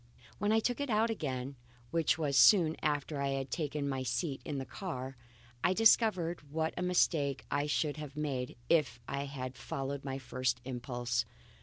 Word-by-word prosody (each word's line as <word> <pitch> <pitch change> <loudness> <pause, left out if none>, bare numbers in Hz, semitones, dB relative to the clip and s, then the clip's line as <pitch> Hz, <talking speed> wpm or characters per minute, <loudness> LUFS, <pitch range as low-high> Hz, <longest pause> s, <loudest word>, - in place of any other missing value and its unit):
When 205 0 +1
I 220 - +5
took 245 +4 -1
it 285 - -2
out 225 +1 +3
again 130 - -3 0.3
which 160 -3 +2
was 145 -4 0
soon 165 -1 +7
after 145 -1 -1
I 140 - +1
had 135 -1 -4
taken 150 -2 -2
my 135 -1 -1
seat 130 +3 -2
in 145 - -4
the 135 - -3
car 135 -6 -5 0.5
I 180 - +4
discovered 200 -5 +4
what 160 +1 -1
a - - -3
mistake 155 -6 +2
I 145 +1 +1
should 150 0 0
have 150 -1 -7
made 135 -5 -2
if 140 -8 +2
I 140 0 -2
had 130 -2 -5
followed 135 +2 -4
my 135 -1 -3
first 130 -1 -1
impulse. 120 -1 -2
145 Hz, 175 wpm, -33 LUFS, 130-165 Hz, 0.5 s, soon